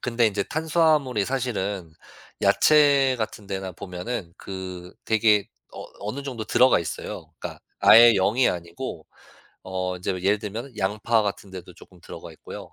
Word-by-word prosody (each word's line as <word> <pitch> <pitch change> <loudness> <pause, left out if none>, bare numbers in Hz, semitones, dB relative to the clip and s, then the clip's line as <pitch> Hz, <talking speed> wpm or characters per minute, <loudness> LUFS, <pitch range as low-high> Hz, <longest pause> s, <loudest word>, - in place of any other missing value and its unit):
근데 120 -1 +1
인제 100 -2 -1
탄수화물이 155 -7 +1
사실은 100 -9 -3 0.5
야채 140 -3 +4
같은 110 -2 -5
데나 95 -1 -5
보면은 90 +1 -6
그 90 -2 -8
되게 110 -2 +3 0.3
어 - - -8 0.2
어느 110 +8 -5
정도 125 -5 -5
들어가 125 +4 +4
있어요. 85 - -6
그니까 - - -7 0.2
아예 115 +1 +8
0 100 +3 +1
이 130 - +5
아니고 85 -1 -6 0.6
어 90 -1 -3
인제 90 +1 -3
예를 100 +3 +2
들면 110 +5 -7
양파 105 +3 +1
같은 100 -1 -4
데도 95 -2 -10
조금 - - -18
들어가 - - -10
있고요. - - -11
105 Hz, 305 characters per minute, -24 LUFS, 95-125 Hz, 0.6 s, 아예